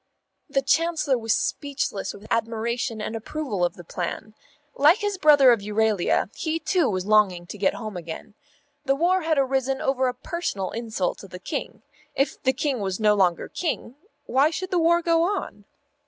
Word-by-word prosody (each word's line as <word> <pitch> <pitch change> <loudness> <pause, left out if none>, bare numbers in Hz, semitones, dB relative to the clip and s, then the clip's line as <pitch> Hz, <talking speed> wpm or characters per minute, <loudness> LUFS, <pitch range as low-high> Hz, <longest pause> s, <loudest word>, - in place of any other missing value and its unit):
The 275 -1 +1
Chancellor 320 -1 +2
was 225 -2 +1
speechless 280 -8 -2
with 205 - -13
admiration 230 +1 -1
and 220 - -4
approval 225 -4 -3
of 175 - 0
the 175 - -11
plan. 175 +5 -5 0.4
Like 300 +7 +5
his 410 -3 -2
brother 290 -5 +7
of 235 - +3
Euralia, 210 -1 +1
he 320 0 -1
too 340 -2 +1
was 185 -2 -2
longing 200 -5 +3
to 190 - -8
get 195 - +2
home 215 -4 -6
again. 170 +5 -7 0.5
The 270 -2 +2
war 360 +5 +2
had 320 -2 0
arisen 265 0 +1
over 265 -1 +1
a 250 - -2
personal 250 - -3
insult 220 -5 -2
to 195 - -10
the 180 - -9
King. 280 - -5 0.3
If 275 - 0
the 260 - +3
King 265 -1 -1
was 190 -1 -2
no 210 -1 +4
longer 185 -4 +1
King, 315 -8 -3 0.3
why 275 +4 +3
should 365 +4 -5
the 360 - +2
war 340 +1 +3
go 330 -1 +3
on? 390 +5 -2
255 Hz, 180 wpm, -24 LUFS, 210-310 Hz, 0.5 s, brother